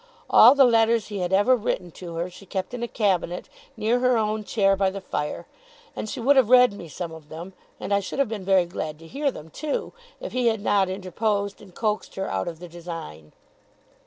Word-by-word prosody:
All 245 Hz, +5 st, +9 dB
the 280 Hz, -, +7 dB
letters 230 Hz, -2 st, +3 dB
he 205 Hz, -2 st, -4 dB
had 180 Hz, 0 st, -2 dB
ever 205 Hz, +7 st, +5 dB
written 180 Hz, -6 st, -3 dB
to 170 Hz, 0 st, -9 dB
her, 170 Hz, +2 st, -2 dB
she 185 Hz, +2 st, -14 dB
kept 190 Hz, +5 st, -4 dB
in 245 Hz, -, -5 dB
a 240 Hz, -, -1 dB
cabinet 185 Hz, -6 st, -1 dB, 0.3 s
near 230 Hz, +3 st, +1 dB
her 250 Hz, -1 st, +3 dB
own 215 Hz, 0 st, -1 dB
chair 195 Hz, -2 st, +2 dB
by 195 Hz, 0 st, +2 dB
the 195 Hz, +1 st, -6 dB
fire; 150 Hz, -5 st, -4 dB, 0.5 s
and 215 Hz, -, -4 dB
she 260 Hz, -, -5 dB
would 270 Hz, +4 st, +4 dB
have 255 Hz, -4 st, +5 dB
read 250 Hz, -3 st, +7 dB
me 180 Hz, -4 st, -9 dB
some 165 Hz, +3 st, -6 dB
of 160 Hz, -2 st, -12 dB
them, 170 Hz, +4 st, -8 dB, 0.3 s
and 200 Hz, -, -2 dB
I 200 Hz, -, +4 dB
should 195 Hz, -, -6 dB
have 275 Hz, -2 st, +2 dB
been 215 Hz, -3 st, -5 dB
very 190 Hz, -1 st, +3 dB
glad 155 Hz, -3 st, -5 dB
to 165 Hz, -, -15 dB
hear 280 Hz, -, -1 dB
them 160 Hz, -, -9 dB
too, 300 Hz, -, -3 dB, 0.3 s
if -, -, -6 dB
he 250 Hz, -1 st, +1 dB
had 220 Hz, -2 st, +1 dB
not 200 Hz, -2 st, +2 dB
interposed, 200 Hz, +2 st, -2 dB
and 190 Hz, -4 st, -15 dB
coaxed 215 Hz, -2 st, -2 dB
her 195 Hz, -, -3 dB
out 95 Hz, 0 st, -2 dB
of 165 Hz, -, -5 dB
the 175 Hz, +2 st, -10 dB
design. 165 Hz, -, -9 dB
200 Hz, 225 wpm, -24 LUFS, 175-230 Hz, 0.5 s, All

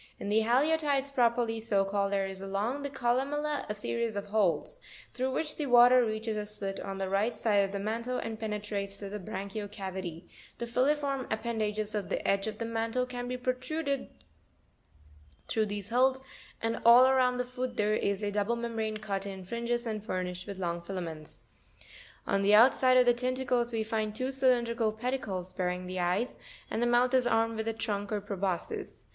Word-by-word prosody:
In 200 Hz, -, -4 dB
the 215 Hz, +2 st, +4 dB
Haliotides 280 Hz, +3 st, +2 dB
properly 235 Hz, -2 st, +2 dB
so 205 Hz, -3 st, +1 dB
called, 200 Hz, 0 st, 0 dB
there 195 Hz, -1 st, +1 dB
is 190 Hz, 0 st, -6 dB
along 205 Hz, +8 st, -2 dB
the 285 Hz, -, -3 dB
columella 275 Hz, +4 st, -1 dB
a 210 Hz, -, -2 dB
series 230 Hz, +1 st, -2 dB
of 200 Hz, -, -3 dB
holes, 190 Hz, -8 st, +1 dB, 0.3 s
through 260 Hz, +1 st, -1 dB
which 305 Hz, +3 st, -2 dB
the 295 Hz, -, -2 dB
water 245 Hz, 0 st, +7 dB
reaches 220 Hz, 0 st, -2 dB
a 210 Hz, 0 st, -3 dB
slit 200 Hz, -2 st, -5 dB
on 195 Hz, 0 st, -5 dB
the 195 Hz, 0 st, -2 dB
right 210 Hz, +4 st, 0 dB
side 210 Hz, -2 st, +2 dB
of 195 Hz, -, -2 dB
the 200 Hz, -, -3 dB
mantle, 230 Hz, +5 st, -2 dB
and 225 Hz, -1 st, -4 dB
penetrates 205 Hz, -2 st, -3 dB
to 200 Hz, -, -6 dB
the 210 Hz, +1 st, -5 dB
branchial 205 Hz, +1 st, -5 dB
cavity; 185 Hz, -4 st, -6 dB, 0.3 s
the 235 Hz, -, -3 dB
filiform 275 Hz, +3 st, +1 dB
ap 220 Hz, 0 st, -1 dB
pendages 215 Hz, -2 st, -2 dB
of 205 Hz, -3 st, -3 dB
the -, -, -2 dB
edge 195 Hz, +1 st, +2 dB
of 215 Hz, -1 st, -4 dB
the 230 Hz, -, -3 dB
mantle 230 Hz, +2 st, -1 dB
can 245 Hz, -1 st, -5 dB
be 250 Hz, 0 st, -3 dB
protruded 260 Hz, +3 st, -2 dB, 1.4 s
through 220 Hz, -1 st, +1 dB
these 205 Hz, 0 st, -5 dB
holes, 260 Hz, +2 st, +3 dB, 0.4 s
andall 235 Hz, +2 st, +6 dB
around 255 Hz, -1 st, +3 dB
the 250 Hz, -, -1 dB
foot 250 Hz, 0 st, -4 dB
there 210 Hz, 0 st, +2 dB
is 200 Hz, -1 st, 0 dB
a 205 Hz, -, 0 dB
double 205 Hz, +3 st, 0 dB
membrane 225 Hz, -2 st, -2 dB
cut 200 Hz, -2 st, -3 dB
in 190 Hz, -2 st, -7 dB
fringes 235 Hz, +3 st, -2 dB
and 215 Hz, -2 st, -3 dB
furnished 180 Hz, -2 st, -3 dB
with 200 Hz, -1 st, -6 dB
long 170 Hz, -2 st, -2 dB
filaments. 170 Hz, -4 st, -7 dB, 0.8 s
On 195 Hz, -, +1 dB
the 205 Hz, +1 st, +5 dB
outside 255 Hz, +2 st, +6 dB
of 250 Hz, -, +6 dB
the 245 Hz, -, +6 dB
tentacles 250 Hz, -1 st, 0 dB
we 225 Hz, -1 st, -1 dB
find 215 Hz, -1 st, -2 dB
two 255 Hz, +3 st, -2 dB
cylindrical 240 Hz, -4 st, +2 dB
pedicles, 220 Hz, -6 st, -3 dB
bearing 180 Hz, 0 st, -2 dB
the 185 Hz, 0 st, -4 dB
eyes; 180 Hz, +7 st, 0 dB, 0.3 s
and 225 Hz, -, -1 dB
the 240 Hz, -, +3 dB
mouth 245 Hz, +1 st, +3 dB
is 255 Hz, -2 st, +4 dB
armed 225 Hz, -1 st, +2 dB
with 220 Hz, 0 st, -3 dB
a -, -, +2 dB
trunk 205 Hz, -2 st, -3 dB
or 210 Hz, -, 0 dB
proboscis. 195 Hz, -3 st, -4 dB
220 Hz, 190 wpm, -30 LUFS, 200-250 Hz, 1.4 s, water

